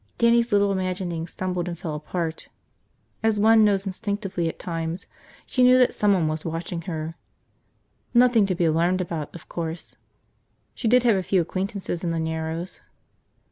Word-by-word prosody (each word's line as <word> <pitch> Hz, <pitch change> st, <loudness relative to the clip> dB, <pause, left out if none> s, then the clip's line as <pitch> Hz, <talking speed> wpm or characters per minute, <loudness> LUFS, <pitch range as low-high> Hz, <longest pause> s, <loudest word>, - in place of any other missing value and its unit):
Dannie's 235 Hz, 0 st, +3 dB
little 200 Hz, -1 st, +3 dB
imaginings 180 Hz, -3 st, -2 dB
stumbled 180 Hz, -1 st, -3 dB
and 170 Hz, -1 st, -4 dB
fell 165 Hz, -3 st, -5 dB
apart. 160 Hz, +2 st, -4 dB, 0.7 s
As 220 Hz, -2 st, +2 dB
one 220 Hz, +1 st, +6 dB
knows 200 Hz, -2 st, +2 dB
instinctively 195 Hz, -3 st, -2 dB
at -, -, -8 dB
times, 165 Hz, +1 st, -4 dB, 0.4 s
she 255 Hz, -, -1 dB
knew 250 Hz, 0 st, +7 dB
that 250 Hz, -1 st, +4 dB
someone 195 Hz, -6 st, +2 dB
was 155 Hz, 0 st, -2 dB
watching 165 Hz, +1 st, -4 dB
her. 160 Hz, -1 st, -4 dB, 1.0 s
Nothing 240 Hz, -4 st, +5 dB
to 185 Hz, -, 0 dB
be 175 Hz, -1 st, +1 dB
alarmed 170 Hz, +3 st, +2 dB
about, 165 Hz, -5 st, -3 dB
of 170 Hz, -, -11 dB
course. 165 Hz, 0 st, -6 dB, 0.8 s
She 235 Hz, -, -3 dB
did 250 Hz, +2 st, +5 dB
have 230 Hz, -5 st, +4 dB
a -, -, 0 dB
few 185 Hz, +1 st, +1 dB
acquaintances 185 Hz, +1 st, -3 dB
in 175 Hz, -, 0 dB
the 165 Hz, 0 st, -1 dB
Narrows. 160 Hz, +2 st, -3 dB
180 Hz, 160 wpm, -24 LUFS, 165-205 Hz, 1.0 s, knew